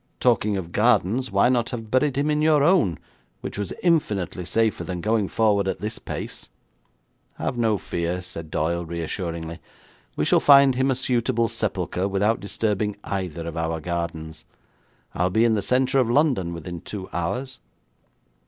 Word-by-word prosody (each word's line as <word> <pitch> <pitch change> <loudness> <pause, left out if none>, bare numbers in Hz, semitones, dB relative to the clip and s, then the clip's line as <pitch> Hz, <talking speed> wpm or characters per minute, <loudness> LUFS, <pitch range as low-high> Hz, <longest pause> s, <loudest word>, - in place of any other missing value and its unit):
Talking 105 -4 +2
of 85 -3 -5
gardens, 120 +11 +2
why 100 +3 +3
not 120 -2 +1
have 115 -3 -6
buried 130 +1 +2
him 145 +2 +1
in 150 0 +1
your 155 -2 +4
own, 155 - +3 0.4
which - - -6
was 100 -3 -3
infinitely 105 - +1
safer 110 +3 +1
than 90 -1 -4
going 105 +1 +1
forward 105 -3 +2
at - - -2
this 110 +2 -4
pace.' - - -7 0.9
'Have - - -3
no 115 -3 +2
fear,' 85 0 -3
said 85 -2 -8
Doyle 85 +3 -1
reassuringly, 85 0 -4 0.6
'we - - 0
shall - - +4
find 140 -2 +7
him 130 +2 +1
a 135 - +2
suitable 120 -2 +1
sepulchre 95 -3 -2
without 100 +3 +1
disturbing 105 0 -1
either 90 -4 -4
of 85 - -5
our 80 0 -2
gardens. 80 -1 -4 0.7
I'll 90 +1 +1
be 110 +5 +3
in 115 - +3
the 105 - +1
centre 130 +4 +2
of 125 -3 +2
London 125 - +2
within 85 0 -6
two 95 -3 -7
hours.' 125 +10 -3
105 Hz, 160 wpm, -24 LUFS, 85-125 Hz, 0.9 s, find